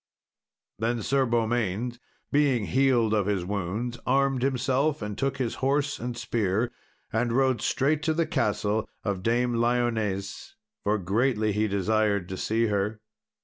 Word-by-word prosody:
Then 115 0 -1
Sir 135 +2 +2
Beaumains, 120 0 0 0.3
being 140 -7 +3
healed 125 -4 +3
of 105 -2 +1
his 100 -4 0
wounds, 105 +5 -3
armed 135 -2 +2
himself, 135 +3 +1
and 105 -1 -4
took 135 +4 -1
his 125 -4 -1
horse 140 +2 +1
and 120 0 -4
spear 115 -1 0 0.4
and 120 +2 +1
rode 130 0 +2
straight 145 +3 +1
to 160 -1 +1
the 165 0 +2
castle 110 -5 0
of 100 -3 -2
Dame 120 +3 +1
Lyones, 115 -5 -1 0.3
for 105 +1 +2
greatly 110 +3 +1
he 105 +2 +1
desired 100 -1 +1
to 95 - -4
see 115 +4 +1
her. 105 0 -1
115 Hz, 145 wpm, -27 LUFS, 105-130 Hz, 0.4 s, being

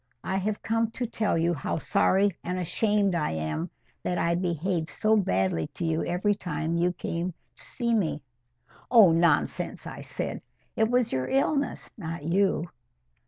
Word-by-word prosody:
I 190 - -1
have 205 +2 -2
come 225 0 +1
to 250 - -2
tell 220 -5 0
you 170 +1 +2
how 145 0 -2
sorry 195 +3 +2
and 180 +1 -2
ashamed 200 +2 +1
I 155 - 0
am 80 - -3 0.3
that 180 - -1
I 170 0 +2
behaved 170 -1 -1
so 215 +1 +2
badly 95 - +1
to 175 - -3
you 160 0 0
every 190 +4 +1
time 165 -4 -3
you 175 +1 +2
came 175 0 -3 0.2
to - - -10
see 235 -2 -2
me." 160 -9 0 0.7
"Oh, 220 -8 +8
nonsense!" 170 +1 +1
I - - -7
said. - - -4 0.3
"It 220 0 +2
was 245 -1 +2
your 130 -1 -1
illness, 280 +1 0
not 165 -3 -5
you." 175 +1 +1
180 Hz, 165 wpm, -27 LUFS, 165-210 Hz, 0.7 s, Oh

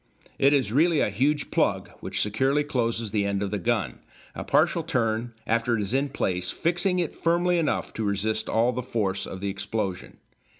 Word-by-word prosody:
It 140 - +5
is 130 -8 +2
really 160 +5 +3
a - - +1
huge 140 +8 0
plug - - +1
which - - -2
securely 135 +8 +1
closes 115 -6 -1
the 105 -1 +1
end 100 0 -1
of 100 - -3
the 105 - -1
gun, 85 - -1 0.3
a - - -5
partial - - +2
turn 115 -1 -1
after 115 +1 +1
it - - -1
is 100 +4 -4
in 140 +2 +1
place 90 -8 -2
fixing 175 +2 +1
it 175 -3 -1
firmly 175 +1 +1
enough 160 - -1
to 110 - -3
resist 110 +2 -1
all 115 +2 +3
the 125 +1 -3
force 100 -6 -2
of 95 - -7
the 100 - -1
explosion. 100 -1 -4
115 Hz, 195 wpm, -26 LUFS, 100-145 Hz, 0.3 s, It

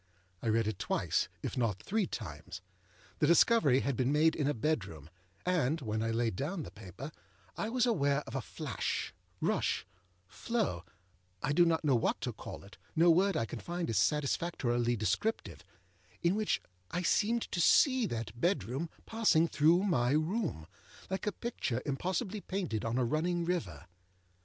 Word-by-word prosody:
I - - -4
read 115 0 +2
it 110 - -3
twice, - - 0
if - - -3
not 115 -6 0
three 210 -2 0
times. 80 -1 -7 0.6
The - - +3
discovery 170 - +5
had 140 -2 -1
been 130 +2 +1
made 160 +2 +4
in 145 - 0
a 145 - +2
bedroom, 100 - -2 0.3
and, 165 -4 +1
when 110 -4 -2
I 115 - 0
laid 115 -2 0
down 160 - -3
the - - -9
paper, 110 - -9 0.4
I 215 - -2
was 245 +1 +2
aware 145 - +2
of 110 - -10
a 135 - -1
flashârushâflowâI 90 - -3 0.7
do 175 +3 +5
not 165 -1 +1
know 140 -4 +4
what 115 - +1
to 125 - -2
call - - -9
it, 100 - -15 0.2
âno 170 +1 +7
word 195 +3 +3
I 115 - +1
can 105 - -6
find 175 -5 -3
is 105 - +2
satisfactorily 125 - +1
descriptive, 120 - -1 0.6
âin 170 - +4
which 215 +1 0 0.3
I 180 - -2
seemed 225 +6 +2
to 175 - 0
see 255 - +5
that 115 - -4
bedroom 160 - 0 0.2
passing 215 -8 +3
through 165 +4 +4
my 135 -10 +2
room, 155 - -1 0.5
like 190 +2 -2
a - - +2
picture 185 - -3
impossibly 185 - -2
painted 180 - -3
on 115 +2 -1
a 130 - +2
running 170 +6 0
river. 95 - -2
145 Hz, 160 wpm, -32 LUFS, 115-180 Hz, 0.7 s, âno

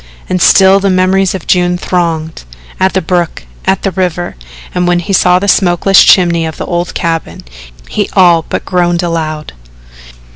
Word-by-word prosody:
And 185 -1 -2
still 190 +2 +5
the 200 0 0
memories 185 +1 +1
of 185 - -7
June 180 -1 +1
thronged 165 - -3 0.4
at 190 0 +1
the 190 - -1
brook 175 - -2 0.2
at 190 - 0
the 195 - -1
river 175 -1 -3 0.4
and 180 0 -1
when 175 0 +2
he 195 +3 -3
saw 180 -1 +3
the 200 +2 -2
smokeless 185 0 +3
chimney 170 -3 +3
of 160 -1 -5
the - - -5
old 175 0 -3
cabin, 165 - -3 0.4
he - - -3
all 175 -3 +4
but - - -4
groaned 175 -1 0
aloud. 155 -3 -4
175 Hz, 170 wpm, -11 LUFS, 170-185 Hz, 0.4 s, still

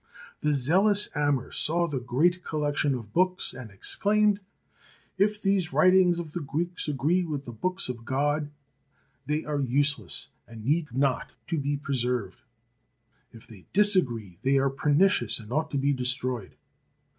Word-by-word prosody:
The 150 - +1
zealous 190 +10 +3
Amr 145 -3 0
saw 170 +2 +1
the 140 -5 -3
great 160 +9 +1
collection 145 -2 -1
of 115 -4 -9
books 185 +1 +1
and 125 -4 -9
exclaimed: 205 - +1 0.3
' - - -33
' - - -35
If 210 0 -3
these 195 -5 +1
writings 180 +3 +5
of 170 -3 -6
the 175 - -4
Greeks 170 +5 -3
agree 150 +6 +1
with 150 -4 -4
the 120 - -7
books 185 - 0
of 120 -2 -6
God, 145 +4 0 0.8
they 150 +1 -1
are 150 -1 -1
useless 135 -5 0 0.2
and 115 -2 -11
need 150 +1 0
not 135 +1 -1
be 145 -3 -1
preserved; 125 -8 -2 0.9
if 115 - -15
they 100 -5 -15
disagree, 125 - +1
they 135 +3 +2
are 135 0 +2
pernicious, 150 +8 +2
and 110 0 -12
ought 155 +4 0
to 140 - -2
be 140 +1 +1
destroyed." 125 -4 -2
145 Hz, 155 wpm, -27 LUFS, 125-175 Hz, 0.9 s, writings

